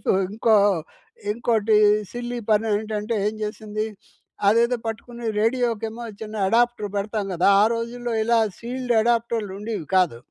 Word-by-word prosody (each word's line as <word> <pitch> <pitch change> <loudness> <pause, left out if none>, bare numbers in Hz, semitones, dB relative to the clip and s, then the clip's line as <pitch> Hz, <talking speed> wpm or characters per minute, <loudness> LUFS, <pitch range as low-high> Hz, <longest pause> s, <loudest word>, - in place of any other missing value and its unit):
Wife - - +1 0.2
ఇంకో 220 +1 +3 0.8
ఇంకోటి 220 -1 +2 0.4
silly 240 0 -4
పనేంటంటే, 215 +1 0
ఏం 215 - -1
జేసిందీ, 215 0 -3 0.6
అదేదో 235 +3 +3
పట్టుకుని, 235 +2 -6
రేడియోకేమో 230 -1 -1 0.2
చిన్న 215 0 -6
ఎడాప్టర్ 235 -1 +2
బెడతాం 210 0 -2
గదా! 175 +3 +3
ఆ - - +6
రోజుల్లో 235 +1 -4
ఇలా 235 0 +3 0.2
సీల్డ్ 245 +1 -3
ఎడాప్టర్లుండేవి 220 -5 -1
కాదు. 175 -11 +2
225 Hz, 115 wpm, -23 LUFS, 210-235 Hz, 0.8 s, ఆ